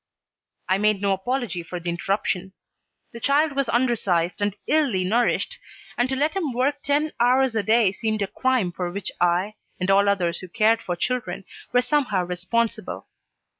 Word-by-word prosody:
I 190 +1 +2
made 210 -1 +2
no 200 0 +1
apology 220 -1 -2
for 175 +1 -6
the 170 0 -3
interruption. 190 +1 -2 0.6
The 235 - -9
child 290 +5 +2
was 275 -2 -1
undersized 205 -8 +1
and 205 -1 0
illy 275 -12 +2
nourished, 230 +6 +1 0.4
and 245 +1 +1
to 265 - 0
let 295 +3 +1
him 325 -9 -1
work 280 +4 0
ten 295 +2 +1
hours 250 +1 +3
a 220 - +1
day 220 -1 +3
seemed 215 0 -2
a - - -2
crime 255 -5 0
for 175 0 -3
which 200 +1 -4
I, 175 +4 +2 0.3
and 185 +1 +1
all 200 +1 +4
others 180 -4 0
who 185 - -8
cared 220 +5 +2
for 175 - -3
children, 190 -2 -3 0.3
were 245 - +4
somehow 250 -8 +1
responsible. 185 +6 -2
215 Hz, 170 wpm, -24 LUFS, 185-250 Hz, 0.6 s, all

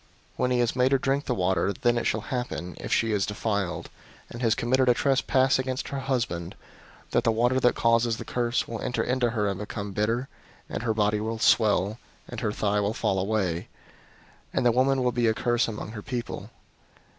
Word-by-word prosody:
005:027 - - -32 0.3
When 125 - +1
he 125 - +2
has 120 0 0
made 130 +1 +3
her - - +6
drink 135 +2 0
the 125 - -1
water, 95 +1 +1
then 120 +2 +1
it 120 - -1
shall 110 - 0
happen, 105 -9 -4
if - - -6
she 115 - +2
is 100 -2 +1
defiled, 100 -3 -2 0.4
and 120 - -7
has 115 -2 +3
committed 130 +2 +2
a 120 - +5
trespass 135 0 +2
against 130 0 -3
her 140 - -3
husband, 115 -11 -2 0.6
that - - +2
the 115 - +3
water 120 +3 +2
that 125 -1 +3
causes 115 0 +2
the - - -7
curse 120 0 -1
will 115 -2 -5
enter 125 - -1
into 125 -1 +1
her 110 -3 0
and 100 -1 -2
become 105 -1 -5
bitter, 115 +6 0 0.4
and - - -4
her 115 -2 0
body 105 -1 +2
will 110 +1 -2
swell, 110 -2 +3 0.3
and - - -6
her 105 - -1
thigh 105 0 0
will 105 +2 -1
fall 95 - 0
away: 95 -4 -1 0.8
and 130 - 0
the 120 - +6
woman 130 +2 +2
will 125 - +2
be 120 -1 +1
a 110 - +2
curse 120 0 +1
among 110 -1 -6
her 110 -2 -7
people. 120 +2 -5
115 Hz, 210 wpm, -26 LUFS, 105-125 Hz, 0.8 s, her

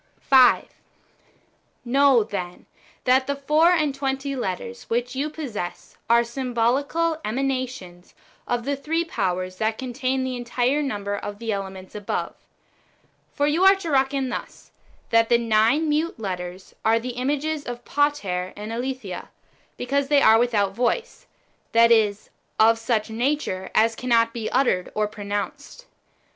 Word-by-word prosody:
5. 260 -2 +5 1.2
Know, 270 -1 +4
then, 180 -4 -6 0.4
that 260 +1 +3
the 280 - 0
four 300 +4 +3
and 305 -5 +2
tw^enty 270 0 -2
letters 235 +1 -4
which 245 +2 -1
you 285 +3 -1
possess 250 - -6
are 235 0 +5
symbolical 265 +7 0
emanations 255 -7 -4 0.3
of 240 -1 -1
the 285 +1 0
three 325 +5 -1
powers 185 - -2
that 220 +1 -1
contain 260 +1 -2
the 260 -1 -3
entire 245 +3 0
number 205 -7 -3
of 205 0 -6
the 225 0 -3
elements 190 -2 -6
above. 205 -1 -3 1.0
For 285 - 0
you 310 +5 +2
are 385 +1 +8
to 345 -5 -5
reckon 270 -1 +1
thus - - -7 0.2
— - - -33
that 230 0 +4
the 235 - +5
nine 230 +7 +2
mute^ 305 +3 0
letters 185 -3 -6
are 225 +1 +4
[the 240 +2 -4
images] 285 +5 -2
of 240 0 -7
Pater 200 -12 0
and 210 +2 -6
Aletheia, 240 -6 -5 0.5
because 275 +3 -1
they 285 -1 +4
are 220 +1 +7
without 210 -5 +1
voice, 350 - -2 0.5
that 230 0 +6
is, 210 -3 +2 0.3
of 225 +1 +5
such 225 -1 -1
a - - -6
nature 235 -6 -1
as 225 +1 +4
cannot 230 -2 +2
be 230 -2 -3
uttered 245 -9 +1
or 215 0 +1
pro 210 0 -9
nounced. 205 - -5
245 Hz, 150 wpm, -23 LUFS, 215-275 Hz, 1.2 s, are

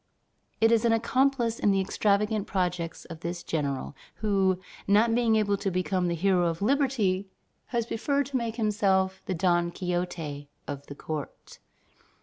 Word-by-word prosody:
It 225 0 +5
is 230 -1 +4
an 230 -1 +4
accomplice 240 0 +1
in - - +3
the 195 -1 +3
extravagant 210 +2 +1
projects 175 -3 -2
of 165 -2 -9
this 170 +1 -4
general, 140 -3 -2 0.2
who, 195 -3 +1 0.3
not 215 +3 +4
being 230 -2 +3
able 205 -2 +2
to 195 - -1
become 185 0 0
the 170 - 0
hero 180 0 +2
of 165 -1 -2
liberty, 215 -6 +1 0.4
has 235 -2 -1
preferred 280 +5 0
to 270 0 -2
make 230 -2 -3
himself 195 -4 +1
the 185 - -1
Don 175 0 +2
Quixote 175 -5 -3 0.2
of 140 0 -6
the 140 - -8
court." 150 0 -7
195 Hz, 155 wpm, -28 LUFS, 175-225 Hz, 0.4 s, It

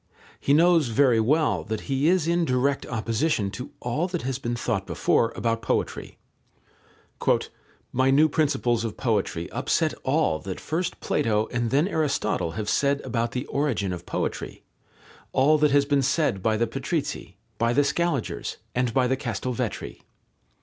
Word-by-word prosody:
He - - 0
knows 165 -2 +5
very 120 0 +3
well 120 - +2
that 110 0 -3
he 135 +2 0
is 175 -2 +3
in 170 0 +2
direct 135 0 0
opposition 115 -1 0
to 125 +6 -7
all 145 +9 -1
that 175 -2 -4
has 130 0 -2
been 120 -2 -2
thought 115 -5 -2
before 115 - +1
about 115 -1 -1
poetry. - - -2 1.8
"My 130 +1 +3
new 145 +4 +5
principles 140 -7 +1
of 115 - -4
poetry 100 -8 -1
upset - - 0
all 80 - +1
that 95 +1 -6
first 170 +3 -3
Plato 110 -6 +1
and 120 -2 -1
then 145 +7 +2
Aristotle 140 - -1
have 105 +3 -4
said 140 +3 +1
about 115 -2 -2
the 125 +2 -3
origin 125 -10 -1
of 90 - -8
poetry, - - -4 0.7
all 150 +4 +4
that 150 0 +4
has 140 0 +4
been 140 -1 +2
said 135 - +1
by 110 +2 +1
the 115 - +2
Patrizzi, 135 - -4 0.2
by 115 +1 +2
the 145 +4 +3
Scaligers, 155 -3 -1 0.2
and 125 -2 0
by 130 - +4
the 130 +1 +1
Castelvetri. 125 -2 -4
130 Hz, 155 wpm, -25 LUFS, 115-145 Hz, 1.8 s, knows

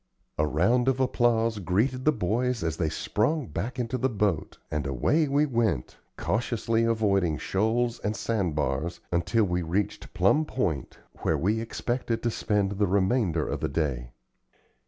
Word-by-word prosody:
A 75 - +3
round 115 - +2
of 135 -1 +2
applause 115 -4 +2
greeted 115 +8 0
the 155 - +6
boys 120 +2 -1
as 80 -1 -1
they 80 -3 0
sprung 135 - 0
back 95 +7 -4
into 125 +1 -2
the 130 - +1
boat, 105 - -1
and 75 -2 -1
away 145 - +2
we 140 +2 +3
went, 115 - -1 0.2
cautiously 115 -1 0
avoiding 100 -8 +2
shoals 115 - 0
and 105 +2 -2
sand 100 -6 -1
bars, 75 +3 -1
until 85 +6 +2
we 90 -2 0
reached 90 +5 -2
Plum 100 +12 +4
Point, 95 - -2 0.2
where - - +1
we 105 +6 +1
expected 115 0 -2
to 120 - +1
spend 105 -3 0
the 100 0 +1
remainder 95 -3 +1
of - - -2
the - - -1
day. 65 -5 -2
105 Hz, 155 wpm, -27 LUFS, 85-120 Hz, 0.2 s, the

